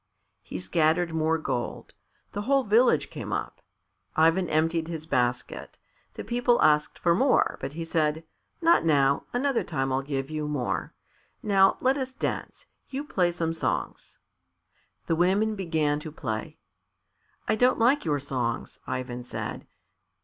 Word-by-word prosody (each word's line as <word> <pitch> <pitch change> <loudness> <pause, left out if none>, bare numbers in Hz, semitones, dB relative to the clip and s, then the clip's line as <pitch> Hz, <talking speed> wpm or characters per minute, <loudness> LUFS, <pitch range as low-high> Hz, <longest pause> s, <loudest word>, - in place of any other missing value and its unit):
He - - -7
scattered 160 - +1
more 160 0 +1
gold. 120 -6 -4 0.4
The 205 - -4
whole 270 +5 +2
village 230 +3 +3
came - - -6
up. - - -4 0.5
Ivan 165 +3 +3
emptied 160 +1 +1
his 160 -2 -6
basket. 125 -4 -2 0.4
The - - -6
people 240 +1 +2
asked 150 0 +3
for 170 - +2
more, 260 +8 +2
but 140 - -4
he 165 +1 -5
said, 160 -1 0 0.4
"Not 335 +1 +5
now; 140 -3 +3
another 265 0 +1
time 135 0 -2
I'll 135 - +1
give 135 0 -4
you 155 -1 -2
more. 145 -5 -2 0.5
Now 195 -2 +4
let 260 +2 +3
us 260 0 -4
dance. 275 - -4 0.2
You 275 +1 -4
play 180 -11 +1
some 165 -1 -2
songs." 165 - -3 0.9
The 165 - +1
women 195 +6 +2
began 160 -7 0
to 155 +1 -8
play. 110 -7 -5 0.9
"I 215 - +2
don't 250 +3 +3
like 250 +6 +3
your 150 -3 0
songs," 125 -4 -3
Ivan 125 -1 -4
said. 125 - -6
165 Hz, 145 wpm, -27 LUFS, 145-210 Hz, 0.9 s, Not